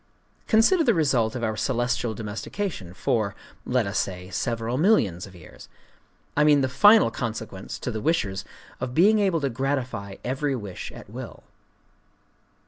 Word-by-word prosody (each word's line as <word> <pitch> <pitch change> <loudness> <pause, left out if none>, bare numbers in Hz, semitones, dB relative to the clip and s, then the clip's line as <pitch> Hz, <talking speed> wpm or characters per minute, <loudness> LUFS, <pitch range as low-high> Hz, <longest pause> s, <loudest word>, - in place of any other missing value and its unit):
Consider 240 +11 +4
the 235 -6 +3
result 130 -8 +2
of 120 - -4
our 110 -1 0
celestial 120 -1 -1
domestication 105 - -5
for—let 110 +4 -2
us 100 +1 -1
say—several 115 +6 -2
millions 105 - +2
of 95 - -15
years: 85 -3 -14 0.7
I 150 - +4
mean 150 -2 +5
the 130 - +2
final 205 - +6
consequence, 110 -5 -5
to 125 - -4
the 110 -1 -4
wishers, 100 -12 0 0.4
of 125 - -4
being 210 +6 +5
able 190 -6 +1
to 140 - 0
gratify 125 -6 -2
every 135 +2 -1
wish 100 -6 -6
at - - -11
will. - - -8
120 Hz, 140 wpm, -25 LUFS, 105-150 Hz, 0.7 s, final